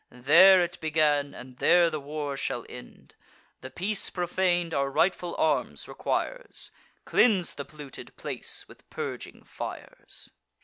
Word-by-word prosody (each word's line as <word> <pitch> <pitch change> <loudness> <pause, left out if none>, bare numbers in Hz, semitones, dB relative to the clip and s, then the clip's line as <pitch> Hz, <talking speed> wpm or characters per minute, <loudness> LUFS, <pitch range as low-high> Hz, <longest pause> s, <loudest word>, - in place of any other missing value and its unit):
There 170 +10 +7
it 175 +1 -5
began, 150 -2 +2
and 125 0 -11
there 170 +3 +5
the 155 - -3
war 145 0 -4
shall 120 -3 -3
end. 125 - -12 0.5
The 130 - -7
peace 195 +7 0
profan'd 175 -1 0
our 140 0 +1
rightful 175 +4 +1
arms 160 - 0
requires; - - -3 0.3
Cleanse 195 -8 +3
the 140 - -6
polluted 145 -1 -11
place - - -4
with - - -18
purging - - -6
fires." - - -8
160 Hz, 130 wpm, -27 LUFS, 140-180 Hz, 0.5 s, There